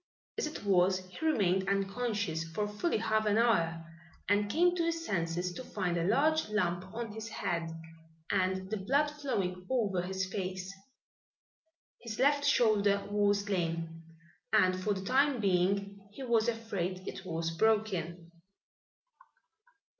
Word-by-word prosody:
As - - 0
it 305 - -7
was 185 -1 +3
he 185 +9 -10
remained 195 - +2
unconscious 200 -3 -1
for 165 +6 -3
fully 210 +11 -1
half 220 0 +1
an 210 0 +3
hour, 165 -8 +2 0.4
and 205 +1 +2
came 350 +8 +3
to 340 - 0
his 330 0 -2
senses 175 - -1
to 255 - -7
find 185 -7 -2
a 170 - 0
large 290 - +2
lump 185 -3 -1
on 230 0 -5
his 220 +1 -6
head 170 -6 -2 0.6
and 190 +1 0
the 215 - 0
blood 280 +10 +1
flowing 195 -11 -3
over 205 -8 +1
his 190 +1 -2
face. 185 0 -4 1.3
His 230 -2 -6
left 285 +2 +3
shoulder 210 -7 +3
was 205 0 +2
lame 165 -3 -2 0.5
and 185 0 +4
for 205 0 +1
the 190 0 -6
time 270 +2 +3
being 200 +1 +1
he 240 +6 -8
was 235 -2 +2
afraid 190 -5 -3
it 195 - -6
was 165 -2 -2
broken. 180 -4 0
200 Hz, 140 wpm, -31 LUFS, 180-225 Hz, 1.3 s, and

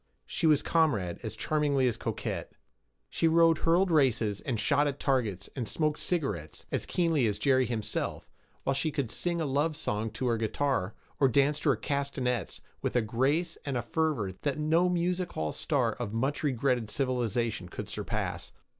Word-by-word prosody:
She 165 - 0
was 150 -2 +4
comrade 115 - +1
as 110 -2 -5
charmingly 140 +3 +1
as 120 - +1
coquette. - - -4 0.5
She 165 - +1
rode 165 0 +5
hurdle 170 +3 +4
races, 125 - +2
and 120 -6 -2
shot 140 +6 +3
at 140 -1 -3
targets, 110 -9 0
and 125 -5 -3
smoked 155 -1 0
cigarettes, 105 - -2
as - - -1
keenly 165 -8 +2
as 105 -1 0
Jerry 130 -3 +3
himself, 110 -3 -3 0.4
while 135 - +1
she 140 +4 +1
could 140 -6 -2
sing 175 -1 -1
a 160 - 0
love 145 +3 0
song 110 -6 -1
to 130 - -3
her 120 -2 +2
guitar, 110 -2 -1 0.2
or 135 - +5
dance 140 +3 +3
to 155 - +1
her 135 - +4
castanets, 130 - -2 0.2
with - - -2
a 120 - +3
grace 140 +10 0
and 135 -3 -2
a 120 - -2
fervor 145 - 0
that 140 -1 -1
no 160 +4 +3
music 180 +1 0
hall 80 -1 -2
star 130 -8 0
of 110 -2 -5
a - - -3
much 135 +5 0
regretted 125 -5 0
civilization 120 -6 -1
could - - -6
surpass. - - -3
135 Hz, 180 wpm, -29 LUFS, 115-155 Hz, 0.5 s, rode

